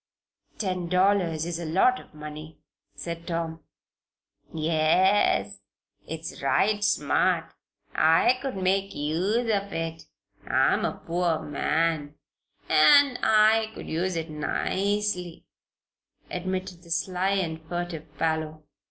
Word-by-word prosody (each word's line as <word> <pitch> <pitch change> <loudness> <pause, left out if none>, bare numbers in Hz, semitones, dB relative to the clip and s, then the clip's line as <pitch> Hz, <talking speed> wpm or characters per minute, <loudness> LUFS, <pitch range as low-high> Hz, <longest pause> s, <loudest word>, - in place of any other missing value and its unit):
"Ten 185 -4 -2
dollars 180 -4 +2
is 170 -1 -4
a 170 - -5
lot 195 +11 +3
of - - -17
money," 150 +1 -9 0.4
said 170 0 -7
Tom. 165 -1 -3 0.9
"Yes. 155 - +2 0.5
It's 160 +1 -7
right 205 +9 +2
smart. 150 -8 +1 0.4
I 165 +11 +4
could 270 -6 -4
make 195 +1 0
use 175 +10 0
of 200 -1 -1
it 165 0 -4 0.4
I'm - - +2
a - - -4
poor 170 -1 0
man, 150 0 -1 0.5
an' 255 - +6
I 220 0 +4
could - - -8
use 180 +3 -1
it 165 -1 -4
nicely," 185 +3 -2 0.9
admitted 185 0 -4
the 170 - -17
sly 185 +3 0
and 165 -5 -2
furtive 160 -2 -6
Parloe. 155 -1 -2
170 Hz, 110 wpm, -26 LUFS, 160-195 Hz, 0.9 s, an